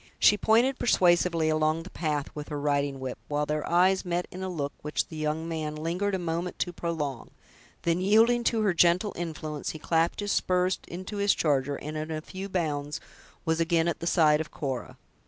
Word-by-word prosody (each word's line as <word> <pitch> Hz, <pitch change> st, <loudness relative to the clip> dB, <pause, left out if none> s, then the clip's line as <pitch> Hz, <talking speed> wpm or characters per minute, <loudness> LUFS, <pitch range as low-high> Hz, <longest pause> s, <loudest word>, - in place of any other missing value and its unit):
She 210 Hz, -, +6 dB
pointed 235 Hz, +6 st, +3 dB
persuasively 175 Hz, -6 st, +3 dB
along 155 Hz, +1 st, +1 dB
the 185 Hz, -, -11 dB
path 150 Hz, -4 st, -2 dB
with 150 Hz, -1 st, -6 dB
her 145 Hz, -2 st, -3 dB
riding 140 Hz, -1 st, 0 dB
whip, 130 Hz, -1 st, -5 dB
while 150 Hz, 0 st, 0 dB
their 150 Hz, 0 st, -2 dB
eyes 185 Hz, +2 st, +4 dB
met 175 Hz, 0 st, -2 dB
in 185 Hz, -, -7 dB
a 190 Hz, -, -3 dB
look 145 Hz, -5 st, -3 dB
which 150 Hz, +1 st, -2 dB
the 160 Hz, -, -8 dB
young 155 Hz, +1 st, -2 dB
man 155 Hz, -2 st, -3 dB
lingered 175 Hz, +6 st, -1 dB
a -, -, 0 dB
moment 175 Hz, 0 st, -3 dB
to 175 Hz, -, -2 dB
prolong; 155 Hz, -7 st, -3 dB, 0.5 s
then, 170 Hz, +1 st, +1 dB
yielding 225 Hz, +5 st, +4 dB
to 225 Hz, -2 st, +2 dB
her 200 Hz, -3 st, +3 dB
gentle 175 Hz, +4 st, +3 dB
influence, 155 Hz, -3 st, -4 dB
he -, -, -6 dB
clapped 165 Hz, +1 st, +1 dB
his 205 Hz, -1 st, -1 dB
spurs 185 Hz, 0 st, +1 dB
into 185 Hz, +4 st, -6 dB
his 200 Hz, 0 st, +3 dB
charger, 140 Hz, -2 st, +1 dB
and 150 Hz, +2 st, -6 dB
in 155 Hz, +1 st, -4 dB
a 155 Hz, -1 st, -2 dB
few 190 Hz, +5 st, -7 dB
bounds 150 Hz, -5 st, -2 dB, 0.5 s
was 160 Hz, 0 st, +1 dB
again 165 Hz, 0 st, +2 dB
at 170 Hz, -, -1 dB
the 170 Hz, -, -4 dB
side 155 Hz, -3 st, +4 dB
of 160 Hz, -, -6 dB
Cora. 135 Hz, -4 st, -5 dB
165 Hz, 200 wpm, -28 LUFS, 150-185 Hz, 0.5 s, She